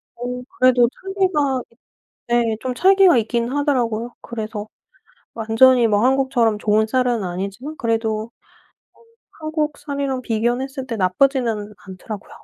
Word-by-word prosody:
어 250 +1 -5 0.2
그래도 250 -2 +5
찰기가 370 -9 0
있 230 - -27 0.5
네 235 -2 +2
좀 255 -1 -3
찰기가 380 0 +5
있긴 235 +1 0
하더라고요. 245 -5 -1
그래서 215 -2 -6 0.7
완전히 230 +2 +4
뭐 210 +2 +2
한국처럼 260 -4 +2
좋은 215 +1 +2
쌀은 245 -2 +1
아니지만 195 - -5
그래도 225 -1 -1 0.6
어 - - -27 0.4
한국 310 -1 -2
쌀이랑 280 -3 -3
비교는 240 +2 0
했을 265 -1 -7
때 230 -3 -4
나쁘지는 215 +1 +1
않더라고요. 195 +2 -8
240 Hz, 305 characters per minute, -20 LUFS, 220-270 Hz, 0.7 s, 그래도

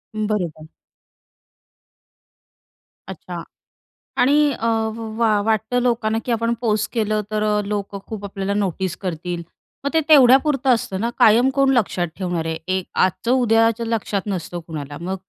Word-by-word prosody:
बरोबर. 185 -8 -2 2.4
अच्छा. - - -7 0.8
आणि 280 +4 +4
अ, 230 - -3 0.5
वा 220 -3 +3
वाटतं 225 +3 +1
लोकांना, 230 -3 0
की 245 - -2
आपण 230 +1 +1
पोस्ट 210 -3 0
केलं 215 -2 0
तर 215 0 0
अ, 210 -1 +1
लोकं 200 -1 -4
खूप 210 -2 -6
आपल्याला 195 0 -3
नोटीस 190 -2 -1
करतील. 175 -1 -4 0.4
मग 280 - 0
ते 320 - +3
तेवढ्यापुरतं 270 0 +5
असतं 195 -5 -2
ना. 235 - 0
कायम 235 +5 +6
कोण 275 -1 +4
लक्षात 185 -5 0
ठेवणार 175 -4 -2
आहे. 160 0 -2
एक 185 -1 -1 0.2
आजचं, 210 +6 -2
उद्याचं 230 -2 +3
लक्षात 215 -3 -1
नसतं 175 -3 -4
कुणाला. 145 -3 -6
मग 185 +2 -3
210 Hz, 135 wpm, -21 LUFS, 190-235 Hz, 2.4 s, कायम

